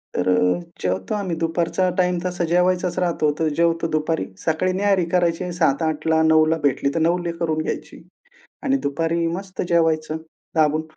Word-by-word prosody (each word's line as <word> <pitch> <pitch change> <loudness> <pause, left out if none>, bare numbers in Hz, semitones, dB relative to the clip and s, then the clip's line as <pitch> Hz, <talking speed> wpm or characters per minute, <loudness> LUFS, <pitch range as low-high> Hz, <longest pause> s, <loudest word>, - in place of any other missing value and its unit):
तर - - 0
अ, 90 - +3 0.2
जेवतो 95 +1 -1
आम्ही 190 -5 -2
दुपारचा 170 +3 0
टाईम 180 -1 +2
तसा 180 -1 -2
जेवायचाच 180 +1 +1
राहतो. 165 -4 +1
तर 160 - +2
जेवतो 165 0 +2
दुपारी. 155 -6 -1 0.2
सकाळी 170 +3 +1
न्याहरी 195 -2 +2
करायची 175 0 +1
7:00-8:00ला, 160 -1 +1
9:00ला 155 +1 +4
भेटली 140 0 +1
तर - - +1
9:00लाही 175 -1 -2
करून 160 -2 -1
घ्यायची. 150 - -5 0.6
आणि 275 -2 +2
दुपारी 165 +4 0
मस्त 185 +3 -4
जेवायचं 160 -2 +1 0.4
दाबून. 155 0 +3
165 Hz, 150 wpm, -22 LUFS, 155-180 Hz, 0.6 s, 9:00ला